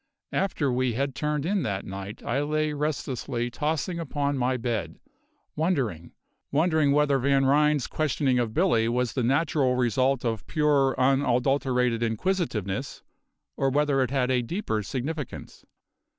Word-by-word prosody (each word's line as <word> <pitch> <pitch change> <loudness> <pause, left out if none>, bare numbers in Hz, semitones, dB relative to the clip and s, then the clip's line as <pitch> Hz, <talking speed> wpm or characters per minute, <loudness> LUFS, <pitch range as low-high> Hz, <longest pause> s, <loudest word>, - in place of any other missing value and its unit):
After 160 -8 0
we 125 -1 +1
had 135 +3 -1
turned 150 +1 -2
in 195 +2 +1
that 100 -6 -3
night 100 +3 -7
I 135 +4 0
lay 155 +1 0
restlessly 130 -5 -2
tossing 160 +5 -2
upon 145 -3 -1
my 130 0 0
bed, 115 -2 -3 0.6
wondering 130 - -1 0.4
wondering 155 -1 +3
whether 145 -1 +3
Van 135 +1 +2
Ryn's 150 0 +3
questioning 140 -4 0
of 120 -2 -1
Billy 115 0 +2
was 120 -1 0
the 130 - -1
natural 135 0 +2
result 125 +2 +1
of 115 -3 -2
pure, 145 -3 +2
unadulterated 130 -2 +2
inquisitiveness, 115 - -2 0.5
or 135 - +1
whether 145 0 +2
it 130 - +1
had 130 -1 0
a 125 -1 +2
deeper 120 - -2
significance. 135 +6 -5
135 Hz, 135 wpm, -26 LUFS, 120-150 Hz, 0.6 s, wondering